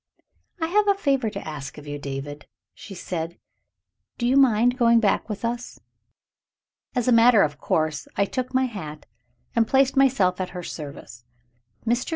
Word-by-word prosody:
"I 325 Hz, -, 0 dB
have 415 Hz, +5 st, +2 dB
a 400 Hz, -, +4 dB
favor 275 Hz, -, +1 dB
to 200 Hz, -4 st, -7 dB
ask 145 Hz, -3 st, -7 dB
of 150 Hz, -, -10 dB
you, 145 Hz, 0 st, -5 dB
David," 145 Hz, +1 st, -6 dB, 0.3 s
she 195 Hz, -, -11 dB
said. 170 Hz, -2 st, -5 dB, 0.8 s
"Do 240 Hz, -, -2 dB
you 255 Hz, -, +3 dB
mind 245 Hz, -2 st, +4 dB
going 235 Hz, -1 st, +5 dB
back 215 Hz, 0 st, +1 dB
with 210 Hz, +2 st, -4 dB
us?" 240 Hz, +1 st, -4 dB, 1.2 s
As 245 Hz, -1 st, 0 dB
a -, -, +4 dB
matter 230 Hz, -2 st, +6 dB
of 145 Hz, -1 st, -2 dB
course 155 Hz, -2 st, -1 dB
I 200 Hz, -, +2 dB
took 255 Hz, +4 st, -4 dB
my 260 Hz, 0 st, +2 dB
hat, 155 Hz, -11 st, -7 dB, 0.5 s
and 230 Hz, -1 st, +3 dB
placed 270 Hz, 0 st, +3 dB
myself 210 Hz, -10 st, +3 dB
at 180 Hz, 0 st, -5 dB
her 180 Hz, -, -5 dB
service. 140 Hz, -8 st, -9 dB, 0.6 s
Mr. 240 Hz, +2 st, 0 dB
215 Hz, 170 wpm, -24 LUFS, 155-250 Hz, 1.2 s, matter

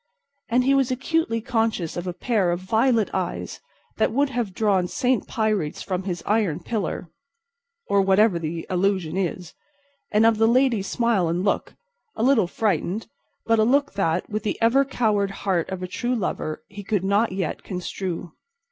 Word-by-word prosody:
And 250 Hz, +1 st, +3 dB
he 270 Hz, +2 st, +3 dB
was 270 Hz, -2 st, +3 dB
acutely 260 Hz, -2 st, 0 dB
conscious 225 Hz, -8 st, -1 dB
of 175 Hz, +1 st, -4 dB
a 180 Hz, -, -2 dB
pair 205 Hz, -2 st, 0 dB
of 175 Hz, 0 st, 0 dB
violet 220 Hz, +3 st, +1 dB
eyes 185 Hz, -2 st, -3 dB, 0.4 s
that -, -, +2 dB
would 280 Hz, +3 st, +2 dB
have 240 Hz, -5 st, -2 dB
drawn 190 Hz, -2 st, +1 dB
Saint 250 Hz, +3 st, 0 dB
Pyrites 215 Hz, -9 st, -1 dB
from 185 Hz, -1 st, -3 dB
his 175 Hz, -3 st, -3 dB
iron 205 Hz, -7 st, +1 dB
pillar—or 460 Hz, -, -4 dB
whatever 195 Hz, -1 st, +4 dB
the 165 Hz, 0 st, -4 dB
allusion 185 Hz, -3 st, 0 dB
is—and 225 Hz, -, -3 dB
of 225 Hz, -1 st, +4 dB
the 225 Hz, -, +5 dB
lady's 235 Hz, -4 st, +3 dB
smile 230 Hz, -7 st, +1 dB
and 170 Hz, +3 st, -1 dB
look—a 470 Hz, -, -4 dB
little 260 Hz, -7 st, +4 dB
frightened, 205 Hz, 0 st, -1 dB, 0.4 s
but 225 Hz, -1 st, +3 dB
a -, -, +5 dB
look 280 Hz, +5 st, +2 dB
that, 180 Hz, -3 st, 0 dB
with 215 Hz, 0 st, -3 dB
the 210 Hz, -, -3 dB
ever 235 Hz, +5 st, +4 dB
coward 215 Hz, -7 st, +1 dB
heart 190 Hz, -3 st, -1 dB
of 190 Hz, -1 st, -5 dB
a -, -, -3 dB
true 245 Hz, +7 st, -2 dB
lover, 165 Hz, -7 st, -3 dB
he 205 Hz, +1 st, -9 dB
could 200 Hz, -2 st, -1 dB
not 200 Hz, +3 st, +2 dB
yet 185 Hz, -3 st, -3 dB
construe. 180 Hz, -2 st, -5 dB
210 Hz, 165 wpm, -24 LUFS, 185-245 Hz, 0.4 s, the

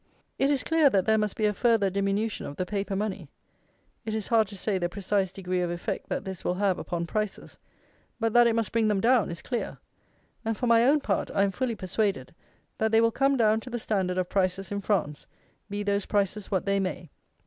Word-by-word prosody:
It 270 Hz, -, +3 dB
is 280 Hz, -3 st, +1 dB
clear 325 Hz, -3 st, +4 dB
that 195 Hz, -6 st, +1 dB
there 220 Hz, 0 st, +3 dB
must 210 Hz, -2 st, -1 dB
be 215 Hz, -, 0 dB
a 210 Hz, -, +2 dB
farther 215 Hz, -2 st, +2 dB
diminution 200 Hz, +3 st, -1 dB
of 145 Hz, -, -7 dB
the 185 Hz, -, -2 dB
paper 200 Hz, 0 st, -3 dB
money. 205 Hz, 0 st, -3 dB, 0.7 s
It 220 Hz, -1 st, -3 dB
is 215 Hz, -2 st, -3 dB
hard 225 Hz, -2 st, +4 dB
to 200 Hz, 0 st, -8 dB
say 195 Hz, 0 st, -1 dB
the 175 Hz, -1 st, -1 dB
precise 195 Hz, 0 st, -1 dB
degree 185 Hz, -2 st, -2 dB
of 175 Hz, -, -1 dB
effect 175 Hz, 0 st, -4 dB
that -, -, -3 dB
this 190 Hz, -2 st, -6 dB
will 180 Hz, -, 0 dB
have 195 Hz, -1 st, +1 dB
upon 170 Hz, -1 st, -3 dB
prices; 210 Hz, +3 st, -4 dB, 0.6 s
but 225 Hz, -1 st, 0 dB
that 240 Hz, 0 st, +6 dB
it 230 Hz, -, +2 dB
must 230 Hz, -1 st, -1 dB
bring 225 Hz, -1 st, +2 dB
them 210 Hz, -2 st, +2 dB
down 240 Hz, 0 st, +3 dB
is 170 Hz, 0 st, -7 dB
clear; 240 Hz, -, -3 dB, 0.7 s
and, 225 Hz, -1 st, -2 dB
for 250 Hz, -, -2 dB
my 230 Hz, -1 st, +5 dB
own 290 Hz, +3 st, +4 dB
part, 200 Hz, -7 st, -1 dB
I 200 Hz, -, +4 dB
am 200 Hz, -, +1 dB
fully 245 Hz, +2 st, -2 dB
persuaded, 190 Hz, -, -2 dB, 0.5 s
that 220 Hz, 0 st, +1 dB
they 225 Hz, -, +5 dB
will 230 Hz, 0 st, +4 dB
come 275 Hz, +3 st, +2 dB
down 220 Hz, -2 st, +3 dB
to 250 Hz, -, -10 dB
the 240 Hz, -, -3 dB
standard 190 Hz, -5 st, -1 dB
of 185 Hz, -1 st, 0 dB
prices 190 Hz, 0 st, -1 dB
in 200 Hz, 0 st, -2 dB
France, 185 Hz, -8 st, -1 dB, 0.4 s
be 205 Hz, +1 st, -3 dB
those 200 Hz, -1 st, 0 dB
prices 205 Hz, 0 st, 0 dB
what 190 Hz, -3 st, 0 dB
they 200 Hz, 0 st, +1 dB
may. 180 Hz, -4 st, -4 dB
205 Hz, 225 wpm, -27 LUFS, 190-225 Hz, 0.7 s, that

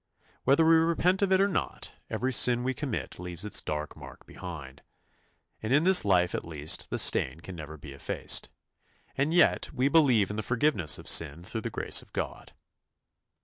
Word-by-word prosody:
Whether 140 Hz, +5 st, +4 dB
we 165 Hz, 0 st, +5 dB
repent 170 Hz, +3 st, +1 dB
of 195 Hz, -1 st, +1 dB
it 190 Hz, -, +4 dB
or 195 Hz, -, +3 dB
not, 195 Hz, -, -4 dB, 0.2 s
every 125 Hz, +4 st, -2 dB
sin 120 Hz, 0 st, +4 dB
we 130 Hz, +1 st, -1 dB
commit 130 Hz, -, -5 dB
leaves 90 Hz, +1 st, -6 dB
its 105 Hz, -, +1 dB
dark 75 Hz, 0 st, -5 dB
mark -, -, -13 dB
behind, 75 Hz, -7 st, -10 dB, 0.8 s
and 110 Hz, -, -4 dB
in 145 Hz, +4 st, +3 dB
this 185 Hz, 0 st, +5 dB
life 90 Hz, -3 st, +2 dB
at -, -, -3 dB
least 75 Hz, -2 st, -1 dB
the -, -, -3 dB
stain 65 Hz, +5 st, +2 dB
can 90 Hz, +3 st, -10 dB
never 80 Hz, -1 st, -9 dB
be 70 Hz, -1 st, -11 dB
effaced; 70 Hz, -, -1 dB, 0.7 s
and 140 Hz, +3 st, 0 dB
yet 175 Hz, 0 st, +2 dB
we 135 Hz, 0 st, 0 dB
believe 130 Hz, -, +3 dB
in 105 Hz, -, -6 dB
the -, -, -2 dB
forgiveness 115 Hz, -, +1 dB
of -, -, -13 dB
sin 80 Hz, +1 st, +2 dB
through 110 Hz, +5 st, -5 dB
the -, -, -4 dB
grace -, -, 0 dB
of -, -, -21 dB
God. -, -, -6 dB
110 Hz, 190 wpm, -28 LUFS, -, 0.8 s, we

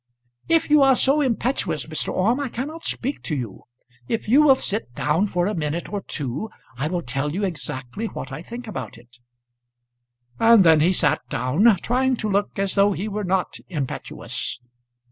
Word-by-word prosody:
"If 330 Hz, -2 st, +2 dB
you 300 Hz, -1 st, +7 dB
are 270 Hz, -1 st, +6 dB
so 275 Hz, +4 st, +3 dB
impetuous, 235 Hz, -, 0 dB
Mr. 155 Hz, -1 st, -2 dB
Orme, 230 Hz, +8 st, +1 dB
I 280 Hz, -3 st, -2 dB
cannot 295 Hz, +8 st, -5 dB
speak 275 Hz, +4 st, -3 dB
to 155 Hz, -, -2 dB
you. 120 Hz, -8 st, -6 dB, 0.4 s
If 230 Hz, -, -2 dB
you 265 Hz, +7 st, +6 dB
will 285 Hz, -3 st, +7 dB
sit 210 Hz, -, -3 dB
down 160 Hz, +8 st, +1 dB
for 180 Hz, -2 st, 0 dB
a 210 Hz, -, 0 dB
minute 160 Hz, +3 st, -3 dB
or 205 Hz, -, -2 dB
two 145 Hz, -, -4 dB, 0.3 s
I 135 Hz, +5 st, -2 dB
will 175 Hz, +1 st, -2 dB
tell 135 Hz, +3 st, -2 dB
you 200 Hz, -, -1 dB
exactly 145 Hz, -, -4 dB
what 135 Hz, -, -7 dB
I 135 Hz, +4 st, -6 dB
think 235 Hz, +7 st, -8 dB
about 130 Hz, -, -6 dB
it." 120 Hz, +1 st, -19 dB, 1.2 s
And 225 Hz, -3 st, +7 dB
then 160 Hz, -2 st, +6 dB
he 165 Hz, +4 st, +4 dB
sat 185 Hz, -, +2 dB
down, 150 Hz, -, +3 dB
trying 255 Hz, +2 st, +2 dB
to 215 Hz, -3 st, -3 dB
look 200 Hz, +2 st, 0 dB
as 195 Hz, -1 st, 0 dB
though 200 Hz, 0 st, +4 dB
he 195 Hz, +3 st, -4 dB
were 210 Hz, 0 st, -3 dB
not 185 Hz, 0 st, -1 dB
impetuous. 145 Hz, -5 st, -4 dB
195 Hz, 185 wpm, -23 LUFS, 150-235 Hz, 1.2 s, you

